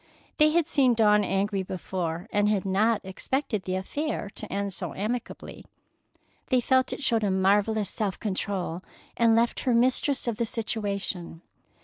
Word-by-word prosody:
They 305 0 +6
had 325 0 +2
seen 260 -6 +3
Dawn 210 -2 +4
angry 195 +1 0
before, 180 -1 -4
and 205 0 +2
had 205 -3 0
not 210 +4 +2
expected 215 +2 -2
the 185 - -2
affair 210 +3 -3
to - - -8
end 200 -1 -2
so - - -6
amicably. 230 +5 -5 0.8
They 255 - +3
felt 260 +1 +2
it - - -5
showed 230 -4 +2
a 205 - +2
marvellous 200 +3 +2
self 205 -5 -2
control, 190 -4 -3 0.3
and 230 -1 +4
left 235 +1 +2
her 250 -2 +1
mistress 255 +3 +2
of 230 -3 -1
the 235 - 0
situation. 200 -6 -3
210 Hz, 155 wpm, -27 LUFS, 190-235 Hz, 0.8 s, They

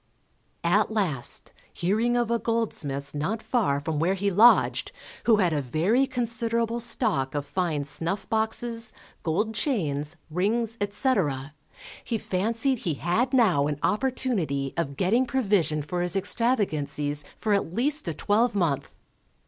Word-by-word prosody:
At - - +3
last, 185 - 0 0.2
hearing 220 +7 0
of 240 -1 0
a 235 - +1
goldsmith's 145 -13 -2
not 190 +10 -2
far 195 - +1
from 150 +1 -3
where 180 +5 +1
he 200 +1 -1
lodged, 225 +6 +4 0.3
who 230 - +6
had 180 -5 +2
a 145 - 0
very 180 - +1
considerable 235 -2 -1
stock 205 - +1
of 145 -1 -2
fine 165 -4 -1
snuff 165 +7 -2
boxes, 225 +1 0 0.3
gold 210 +7 -1
chains, 165 - -1
rings, 220 +6 0
etc., 190 - 0 0.5
he 230 - -2
fancied 230 +7 -1
he 165 -8 -2
had 220 - 0
now 190 - +3
an 150 -1 -2
opportunity 210 - 0
of 140 -5 -3
getting 230 +8 +2
provision 200 - +1
for 175 +4 -3
his 175 +1 +1
extravagancies 155 - 0
for 215 - 0
at 200 -5 0
least 275 - 0
a 165 - -1
twelvemonth. 205 - 0
200 Hz, 135 wpm, -26 LUFS, 155-230 Hz, 0.5 s, who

